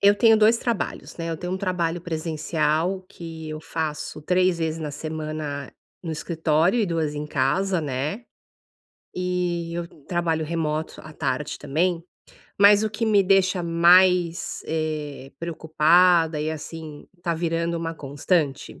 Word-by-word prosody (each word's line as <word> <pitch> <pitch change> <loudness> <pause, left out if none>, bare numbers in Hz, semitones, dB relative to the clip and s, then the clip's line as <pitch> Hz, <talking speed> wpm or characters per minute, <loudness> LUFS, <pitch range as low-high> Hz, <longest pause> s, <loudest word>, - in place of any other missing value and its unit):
eu 200 +1 +6
tenho 225 +1 +5
2 220 +2 +5
trabalhos, 235 -4 -3
né. 165 -1 -4
Eu 165 - -2
tenho 180 +2 -5
um 190 - -2
trabalho 175 -3 -1
presencial 160 +2 -1
que 165 -4 -8
eu 155 0 -6
faço 155 -2 -4
3 180 +1 +2
vezes 160 0 -1
na 150 -2 -3
semana 155 -2 -5 0.3
no 165 -2 -4
escritório, 160 +5 +1
e 210 - +2
2 160 -4 -1
em 150 0 -4
casa, 155 +7 +1
né, 150 - -3 0.9
e 180 -2 -2
eu 170 0 -3 0.2
trabalho 165 -3 0
remoto 155 -1 -2
à 155 - -11
tarde 130 0 -2
também. 165 +4 0 0.6
Mas 205 +1 +7
o 220 - +1
que 215 +2 -2
me 205 -2 +5
deixa 190 -1 +3
mais, 175 +1 +4
eh, 150 -4 -3
preocupada 165 0 +3
e, 155 +1 -1
assim, 155 0 -8 0.2
tá 170 -1 0
virando 170 0 -1
uma 165 0 -3
constante 145 +1 -1
165 Hz, 145 wpm, -24 LUFS, 155-180 Hz, 0.9 s, Mas